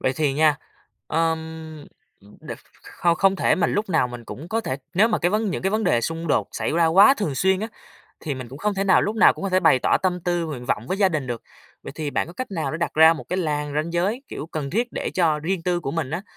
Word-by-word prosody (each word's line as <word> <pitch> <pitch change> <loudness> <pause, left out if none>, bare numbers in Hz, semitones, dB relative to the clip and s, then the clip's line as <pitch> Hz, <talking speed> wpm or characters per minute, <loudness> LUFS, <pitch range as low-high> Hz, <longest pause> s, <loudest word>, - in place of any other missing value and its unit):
Vậy 130 - +1
thì 150 -3 +1
nha, 150 0 +3 0.5
ờm, 165 0 +1 0.8
ừm, 100 +1 -18
đ - - -10 0.3
không 170 -1 0
không 195 +1 +3
thể - - +2
mà 185 - +1
lúc 205 +1 -1
nào 160 -8 +2
mình 120 -1 -9
cũng 150 +8 -9
có 225 +4 0
thể 130 -12 -3 0.2
nếu 210 +6 +4
mà 215 - 0
cái 175 - +1
vấn 215 0 0
những - - -4
cái 190 - +1
vấn 215 +1 0
đề 120 -10 +2
xung 165 +6 -3
đột 150 - +1
xảy - - -2
ra 165 +1 +3
quá 195 +11 +6
thường 200 - -3
xuyên 190 +5 +2
á, 220 - -3 0.5
thì 145 -3 -3
mình 130 -2 -8
cũng 135 +4 -10
không 210 +3 -1
thể 195 0 -1
nào 190 - +4
lúc 215 +2 -2
nào - - +6
cũng - - -10
có - - 0
thể 185 0 +3
bày 160 -7 +5
tỏ - - +2
tâm 180 -1 0
tư 175 -1 -1
nguyện 135 -6 -6
vọng 115 - -1
với 185 - -2
gia 195 -2 +4
đình 155 -7 -3
được. 120 -2 -5 0.4
Vậy - - -8
thì 150 -2 -4
bạn - - -1
có 170 - -10
cách 255 +6 -6
nào 165 -5 -2
để 155 - -4
đặt 170 - -2
ra 160 +1 +7
một 155 - -7
cái 180 - -1
làn 150 -4 -2
ranh 155 +3 -2
giới, 195 +9 -1
kiểu, - - -6
cần 155 -4 -5
thiết 235 +6 -1
để - - -3
cho 165 -4 +2
riêng 165 +3 -2
tư 175 0 0
của 135 -4 -4
mình 155 -4 -3
á, 165 +4 -3
165 Hz, 280 wpm, -23 LUFS, 150-190 Hz, 0.8 s, ra